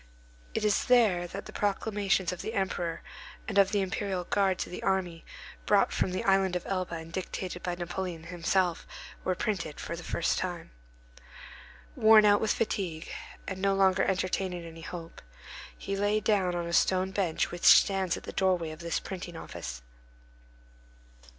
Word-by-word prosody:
It 215 - 0
is 210 - +2
there 215 -8 +4
that 195 +3 -7
the - - -10
proclamations 200 -2 0
of 180 - -6
the 225 - -5
Emperor 175 -4 -2 0.4
and 200 -1 +2
of 195 -1 +5
the 205 - +2
Imperial 190 -1 -2
Guard 190 0 +1
to - - -4
the - - -6
army, 180 -3 -1 0.4
brought - - +4
from - - +1
the 185 - -2
Island 195 -2 +3
of 180 - -3
Elba 185 -3 -2
and 165 0 -8
dictated 185 -1 -4
by 180 -1 -2
Napoleon 175 -1 -4
himself, 175 +1 0 0.4
were 185 - 0
printed 180 -7 -3
for 170 - -4
the 170 - -8
first 170 - 0
time. 175 -2 -4 1.2
Worn 220 -1 +7
out 205 0 +5
with 220 - +1
fatigue, 180 -7 -2 0.4
and 190 -1 -5
no 195 0 +2
longer 190 -1 +4
entertaining 185 -2 -1
any 165 0 -10
hope, 165 0 -8 0.6
he 195 - -4
lay 205 +2 +1
down 195 -5 +1
on 175 -1 -2
a 170 - -5
stone 185 +2 +3
bench 190 -5 0
which 175 - -5
stands 190 -3 +5
at - - -10
the - - -7
doorway 180 -4 +1
of 155 - -10
this 170 -1 -2
printing 175 -3 -7
office. - - -7
185 Hz, 170 wpm, -29 LUFS, 175-195 Hz, 1.2 s, Worn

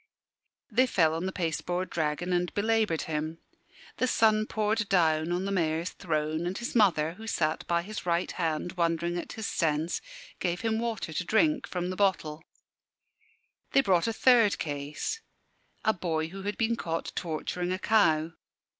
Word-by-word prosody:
They 255 +1 +4
fell 165 -8 +3
on 165 +3 -2
the - - -2
pasteboard 175 +1 -2
dragon 160 +3 -1
and 175 0 +1
belaboured 215 -5 +1
him. 155 +1 -3 0.6
The 255 - +1
sun 215 -2 +3
poured 215 -1 0
down 160 -3 +3
on 180 +2 0
the 200 - -2
Mayor's 165 -2 0
throne; 155 -1 -2
and 185 - -3
his 235 - -4
mother, 170 -8 +3
who 220 +5 -10
sat 155 -6 -1
by 170 0 +1
his 215 +3 -6
right 170 0 0
hand 165 0 -1
wondering 170 -1 0
at - - -7
his 220 - -5
sense, 160 -1 0 0.4
gave 175 -1 -1
him 225 -1 0
water 225 -8 -3
to 180 - -1
drink 305 - +2
from 180 0 -3
the - - -4
bottle. 165 -6 0 1.3
They 275 - +6
brought 185 -5 +2
a - - +1
third 230 -3 +5
case 145 - -4 0.6
a 220 - +4
boy 160 -4 -2
who 195 +3 -8
had 205 +1 -3
been 230 0 +1
caught 165 -6 -3
torturing 175 +2 -2
a 185 - 0
cow. 170 -7 +3
175 Hz, 165 wpm, -29 LUFS, 160-210 Hz, 1.3 s, They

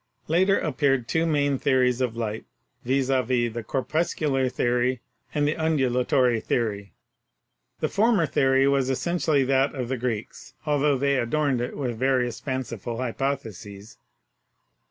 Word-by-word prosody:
Later 190 +5 +3
appeared 135 -4 0
two 165 +1 +1
main 145 -3 +1
theories 130 -2 +2
of 120 -3 -1
light, 110 -1 -3 0.4
viz., 135 +1 0
the 120 -3 0
Corpuscular 135 +1 -1
Theory 125 +1 0 0.3
and 145 -1 +1
the 150 - 0
Undulatory 130 -5 +1
Theory. 100 -5 -2 0.9
The - - +2
former 210 -4 +2
theory 135 -1 +3
was 135 -2 +2
essentially 155 0 +1
that 135 +2 +1
of 125 -3 -4
the 130 - -1
Greeks, 120 +2 -5
altho 145 -1 +2
they 140 +1 +1
adorned 130 +1 0
it 125 - -4
with 120 -5 -3
various 130 -3 +1
fanciful 120 -4 -4
hypotheses. 115 -5 -4
130 Hz, 130 wpm, -25 LUFS, 120-140 Hz, 0.9 s, Later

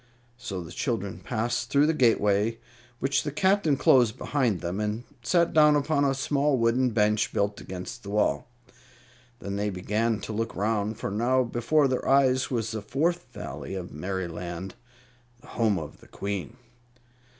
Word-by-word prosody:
So 100 -7 -5
the 80 - -10
children 110 -6 -3
passed 120 0 -2
through 140 +1 +4
the 160 - +2
gateway, 110 -4 +2 0.4
which 135 +1 +1
the 150 - -3
Captain 190 -2 +2
closed 120 -6 +4
behind 125 -10 0
them, 90 +3 -3
and 105 +2 -2 0.2
sat 170 +7 +2
down 150 -1 +6
upon 145 0 +1
a 135 -1 +1
small 140 +1 +1
wooden 120 +2 +2
bench 105 -2 +1
built 100 0 -1
against 95 +6 -7
the 100 - -9
wall. 105 +2 +1 0.9
Then 100 -3 -4
they 105 +1 0
began 105 +4 -1
to 110 - -5
look 115 +1 -3
around, 105 +1 -1
for 105 - -4
now 125 +5 +2
before 125 +5 +2
their 130 -1 -1
eyes 130 -1 +3
was 115 -3 -2
the 110 -1 -4
Fourth 155 +11 -1
Valley - - -7
of 90 -2 -6
Merryland, 90 +1 -5 0.7
the - - -17
home 110 -4 +1
of 75 -4 -7
the - - -18
Queen. 100 +4 -5
115 Hz, 160 wpm, -27 LUFS, 100-135 Hz, 0.9 s, down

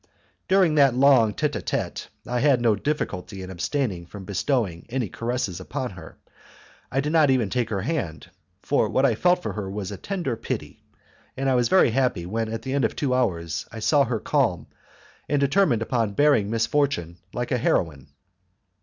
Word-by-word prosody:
During 190 -4 +4
that 140 -4 +4
long 125 -6 +5
tete - - -1
a - - -5
tete - - -3 0.2
I 125 0 -1
had 135 -1 +4
no 115 -3 +3
difficulty 100 -7 -3
in 95 - -8
abstaining 95 - -2
from 100 +1 -10
bestowing 100 - -1
any 120 -4 -2
caresses 115 -2 -3
upon - - -4
her; - - -12 0.7
I 135 - +1
did 150 +2 -2
not 155 -3 +5
even 125 -7 +2
take 125 -3 0
her 100 -3 -2
hand, 105 - -3 0.3
for - - +1
what 130 - +2
I 125 - +3
felt 180 +9 +2
for - - -3
her 100 -3 -4
was 100 0 -5
a 100 - -6
tender 175 - -3
pity; 115 - -5 0.6
and 135 +1 -1
I 135 - +3
was 125 -2 +2
very 185 -10 +5
happy 125 -8 0
when 110 +4 -2
at 115 0 -4
the 130 - -3
end 140 -2 +1
of - - 0
two 135 -4 0
hours 85 -10 -1
I 115 - -9
saw 140 +6 +3
her 115 -2 -2
calm 120 - 0 0.6
and 145 - +2
determined 140 - +2
upon 115 -3 -1
bearing 140 -8 +3
misfortune 115 - 0
like 120 +2 -4
a 125 - +1
heroine. 75 - 0
120 Hz, 190 wpm, -24 LUFS, 100-140 Hz, 0.7 s, long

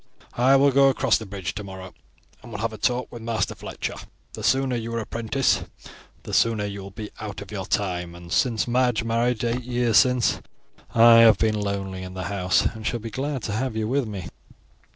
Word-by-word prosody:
I 130 +3 +4
will 140 +1 +5
go 135 +1 +5
across 130 -2 +2
the 110 - -8
bridge 95 -3 -5
tomorrow, 95 -2 -8 0.5
and 120 - -12
will 105 - -5
have 115 0 -2
a - - -7
talk 125 +2 0
with 120 - -9
Master 115 -1 -1
Fletcher. - - -5 0.4
The - - -7
sooner 130 -1 +2
you 115 0 -4
are - - 0
apprenticed, 115 +4 0 0.6
the - - -8
sooner 115 -3 +2
you 100 -1 -5
will 95 - -8
be 105 +2 -8
out 105 -2 -6
of 100 0 -10
your 95 -3 -5
time; 90 -4 -2
and 85 0 -12
since 120 0 +1
Madge 125 -2 +1
married 115 +1 0
eight 120 +1 0
years 120 -2 +1
since 125 -2 +3 0.5
I 115 0 +8
have 110 -3 +7
been 110 0 +1
lonely 100 -2 -3
in 95 0 -8
the 95 - -4
house 90 -1 +2
and 110 -1 -3
shall 120 +2 -1
be 115 0 -7
glad 135 +1 -3
to - - -3
have 120 +3 -2
you 110 -1 -1
with 130 0 0
me." 100 -4 -6
115 Hz, 210 wpm, -24 LUFS, 100-125 Hz, 0.6 s, I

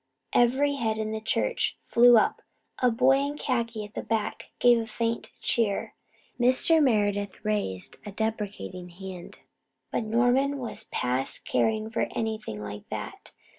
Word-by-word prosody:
Every 265 +4 +3
head 220 -3 0
in 215 0 -2
the 220 0 -3
church 475 - 0
flew 240 0 +6
up. 215 - +2 0.4
A 250 - +4
boy 255 +4 +4
in 285 +1 -2
khaki 230 -6 -2
at 205 - -14
the - - -3
back 220 -2 -2
gave 240 -1 +5
a 225 - -4
faint 230 0 -2
cheer. 220 -4 0 0.5
Mr. 260 +6 +4
Meredith 205 -7 +1
raised 205 - -2
a 205 - -7
deprecating 205 -4 -4
hand, 185 0 -9 0.5
but - - 0
Norman 245 +5 +2
was 245 -4 -4
past 125 +2 -1
caring 220 0 0
for 230 - 0
anything 215 - -3
like 105 0 -8
that. - - -6
225 Hz, 145 wpm, -27 LUFS, 205-245 Hz, 0.5 s, flew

